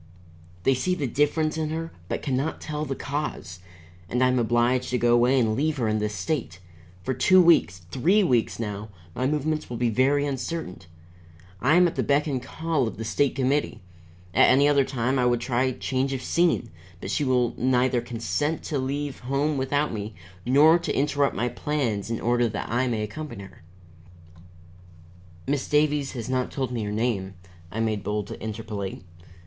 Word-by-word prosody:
They 135 - +4
see 180 +9 0
the 150 - -2
difference 155 +4 +1
in 155 -1 -1
her, 165 +1 -4 0.2
but - - -3
can 135 - 0
not 140 +5 -2
tell 150 0 -4
the 135 -2 -3
cause. 140 - -4 0.5
And 125 +4 +1
I 130 - +4
am 125 0 +2
obliged 120 +2 +1
to 125 - 0
go 120 0 +3
away 125 +3 +4
and 110 -3 +2
leave 150 +4 0
her 120 -4 0
in 110 0 +1
this 105 0 -2
state. 115 +4 -3 0.5
For 130 - -1
two 185 +9 +5
weeks, 90 - +4
three 185 +11 +3
weeks 125 -9 +1
now, 105 -1 -5 0.2
my 130 +6 -1
movements 150 +1 -1
will 120 - -4
be 120 -1 +1
very 140 +5 +2
uncertain. 140 - -4 0.8
I 145 +6 +4
am 180 0 +6
at 170 - -3
the - - +2
beck 145 +1 +2
and 135 -5 -2
call 160 -2 -1
of - - -6
the 115 - -5
State 130 +6 +1
Committee. 135 +2 0 0.5
At - - +6
any 140 +2 +5
other 140 -1 +4
time 130 +1 -1
I 125 - +3
would 120 -1 +2
try 125 +2 0
change 130 +1 -2
of 130 - -4
scene, 170 -9 +1 0.3
but 95 - -5
she 145 - 0
will 125 -3 +2
neither 125 -1 +2
consent 120 +7 -2
to 145 -4 -2
leave 140 +1 -3
home 140 +4 0
without 145 +2 0
me 105 -1 -5 0.3
nor 155 +6 +6
to 170 - -3
interrupt 145 0 +1
my 120 - 0
plans 120 -5 -2
in 115 - -2
order 120 0 +1
that 105 - -4
I 125 +2 +1
may 110 -3 -1
accompany 125 -1 -6
her." 95 - -14 1.8
"Miss 140 0 -1
Davies 150 -2 +2
has 120 -3 -5
not 130 -1 -1
told 130 -3 -3
me 120 -2 -2
your 105 -1 -3
name," 105 -4 -1 0.4
I 110 - -4
made 110 -3 -1
bold 105 0 -2
to - - -8
interpolate. 105 -3 -5
130 Hz, 190 wpm, -25 LUFS, 115-145 Hz, 1.8 s, am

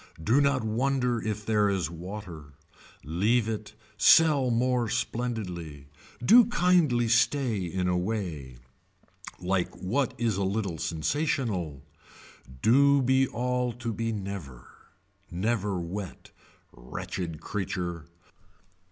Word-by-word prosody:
Do 120 - +3
not 140 -3 +2
wonder 125 +1 0
if 105 -1 -4
there 105 -2 +2
is 95 -4 -1
water. 85 -4 -8 0.5
Leave 105 +9 +1
it, 110 -1 -5 0.2
sell 150 -4 +5
more 120 0 +1
splendidly. 90 - -4 0.4
Do 235 - +8
kindly 175 - +2
stay 120 0 +2
in 90 +1 -2
a 90 - +1
way. 90 - -3 0.8
Like 90 0 -1
what 125 +7 -1
is 115 -5 0
a 100 - 0
little 95 -4 -2
sensational. 85 - -2 0.8
Do 140 +3 +5
be 130 +1 +3
all 125 0 -1
to 120 -1 -4
be 115 +2 -2
never. 95 - -6 0.6
Never 100 +1 -1
wet. 90 +3 -7 0.4
Wretched 80 +7 -6
creature. 90 -5 -4
105 Hz, 110 wpm, -27 LUFS, 90-125 Hz, 0.8 s, Do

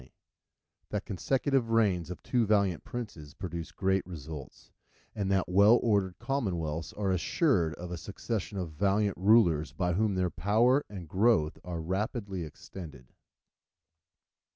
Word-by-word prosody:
—_That 65 - -18 0.8
the 105 - -2
consecutive 125 +5 0
Reigns 100 -7 +2
of 90 - -7
two 120 -4 +1
valiant 100 -5 +2
Princes 100 -12 -7
produce 85 -2 -5
great 95 0 +1
results: 75 -5 -9 0.4
and 100 -2 -2
that 95 -1 +2
well 100 +6 +6
ordered 100 -5 +1
Commonwealths 85 - -2
are 100 -2 -1
assured 90 - +1
of 90 +2 -8
a 90 - -3
Succession 100 -1 -4
of 90 -4 -3
valiant 100 +4 +1
Rulers 90 -6 +4
by 90 -1 0
whom 105 +2 +1
their 90 -1 0
Power 115 - +3
and 95 -5 -8
Growth 95 -4 +2
are 85 -2 -4
rapidly 100 +1 -2
extended_. 75 -4 -10
95 Hz, 135 wpm, -30 LUFS, 85-105 Hz, 0.8 s, well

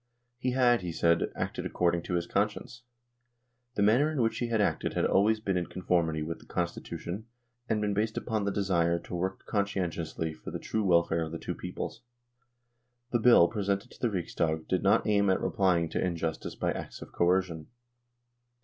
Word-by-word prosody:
He 125 0 0
had, 120 -3 +4
he 90 -2 -4
said, 85 0 +2
acted - - -3
according 85 -1 +1
to 90 - -3
his 85 -1 0
conscience. 105 +6 -2 0.9
The 100 - +2
manner 125 +9 +4
in 155 - -2
which 115 -2 +1
he 120 - -1
had 115 -2 0
acted 100 - 0
had - - +2
always 110 +3 +3
been 100 -4 -1
in 85 - -1
conformity 85 -4 0
with 85 +2 -5
the - - -18
Constitution 85 +3 -4 0.4
and 110 -1 +1
been 105 -1 0
based 110 +2 -1
upon 110 -3 -1
the 100 - 0
desire 85 -4 +1
to 85 - -9
work 95 +2 -3
conscientiously 90 -6 -2
for - - -9
the - - -4
true 110 - -2
welfare 85 -3 +3
of 80 -1 -3
the 85 - -4
two - - -4
peoples. 115 - -6 1.1
The 120 - +2
Bill 115 -7 +7
presented 100 +1 -2
to - - -16
the 120 - +2
Riksdag 80 -4 -2
did 95 - +1
not 100 +1 +3
aim 100 -2 +3
at 95 - +3
replying 90 -4 +2
to - - -1
injustice 85 -3 -2
by - - 0
acts - - -6
of - - -14
coercion. 85 -3 +1
95 Hz, 185 wpm, -29 LUFS, 85-105 Hz, 1.1 s, Bill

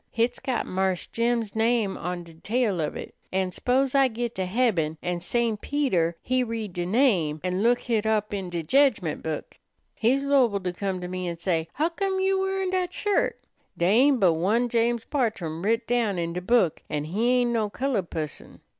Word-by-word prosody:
Hit's 235 +1 0
got 255 -3 -2
Marse 190 -1 -1
Jim's 230 -2 -1
name 225 -3 +1
on 180 0 -4
de 170 -1 -14
tail 205 +2 0
of 150 - -2
it, - - -7 0.2
an' 190 -1 0
s'pose 255 +6 +1
I 275 -1 +5
git 235 0 -3
to 185 -1 -2
heaben, 180 -8 +1
an' 175 -1 -2
St. 225 +3 0
Peter 185 - 0
he 255 0 +1
read 225 -5 -4
de 175 0 -3
name 185 - +2
an' 185 +1 -1
look 240 +2 +3
hit 225 -3 0
up 215 -1 0
in 190 -3 -3
de 170 -1 -3
jedgment 225 - +2
book. 160 -1 -5 0.3
He's 260 +5 +1
'lowable 255 -8 +3
to 180 -1 -2
come 190 0 -3
to 180 - -4
me 185 0 -4
an' 170 -1 -4
say, 165 -2 -1
'Huccome 380 +5 0
you 385 0 +2
wearin' 385 -1 -1
dat 365 -1 0
shirt? 410 +2 0 0.4
Dey 175 +2 +2
ain't 265 +3 +5
but 180 -5 +5
one 215 +9 +1
James 235 0 +1
Bartrum 195 - -2
writ 230 +3 +1
down 230 -5 +1
in 170 -1 -2
de 180 - -3
book, 190 -4 +2
an' 150 -1 -2
he 205 +10 0
ain't 245 -1 +2
no 220 -3 0
colored 230 -6 -2
pusson.' 155 -2 -6
220 Hz, 195 wpm, -26 LUFS, 180-245 Hz, 0.4 s, I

